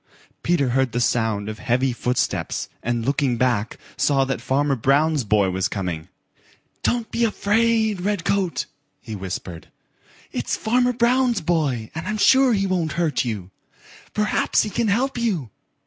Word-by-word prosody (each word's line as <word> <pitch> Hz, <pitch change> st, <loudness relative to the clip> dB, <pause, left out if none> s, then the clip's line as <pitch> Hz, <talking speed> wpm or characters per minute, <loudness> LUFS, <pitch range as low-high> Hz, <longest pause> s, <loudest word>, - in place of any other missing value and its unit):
Peter 160 Hz, -7 st, +1 dB
heard 130 Hz, 0 st, +1 dB
the 120 Hz, -, 0 dB
sound 110 Hz, -3 st, 0 dB
of 110 Hz, 0 st, -6 dB
heavy 125 Hz, +1 st, +1 dB
footsteps, 125 Hz, +1 st, -1 dB
and 120 Hz, -1 st, -1 dB
looking 135 Hz, -2 st, +1 dB
back, 115 Hz, -3 st, 0 dB, 0.2 s
saw 135 Hz, -2 st, +2 dB
that 135 Hz, 0 st, -3 dB
Farmer 140 Hz, +1 st, +1 dB
Brown's 140 Hz, +4 st, +2 dB
boy 100 Hz, -3 st, +2 dB
was 95 Hz, +1 st, 0 dB
coming. 90 Hz, -6 st, -4 dB, 0.7 s
"Don't 240 Hz, -2 st, -1 dB
be 235 Hz, -, 0 dB
afraid, 220 Hz, -1 st, +2 dB
Redcoat," 195 Hz, -2 st, 0 dB, 0.3 s
he 110 Hz, -3 st, -7 dB
whispered. 95 Hz, -3 st, -6 dB, 0.6 s
"It's -, -, -2 dB
Farmer 245 Hz, +2 st, +2 dB
Brown's 240 Hz, -2 st, +2 dB
boy 150 Hz, -9 st, 0 dB
and 160 Hz, +3 st, -5 dB
I'm 215 Hz, +1 st, -1 dB
sure 265 Hz, +3 st, +5 dB
he 195 Hz, -2 st, +1 dB
won't 175 Hz, -5 st, -1 dB
hurt 160 Hz, -4 st, 0 dB
you. 100 Hz, -6 st, -4 dB, 0.6 s
Perhaps 210 Hz, 0 st, +2 dB
he 210 Hz, -, -4 dB
can 230 Hz, -, 0 dB
help 245 Hz, +5 st, 0 dB
you." 180 Hz, -, -1 dB
145 Hz, 150 wpm, -22 LUFS, -, 0.7 s, sure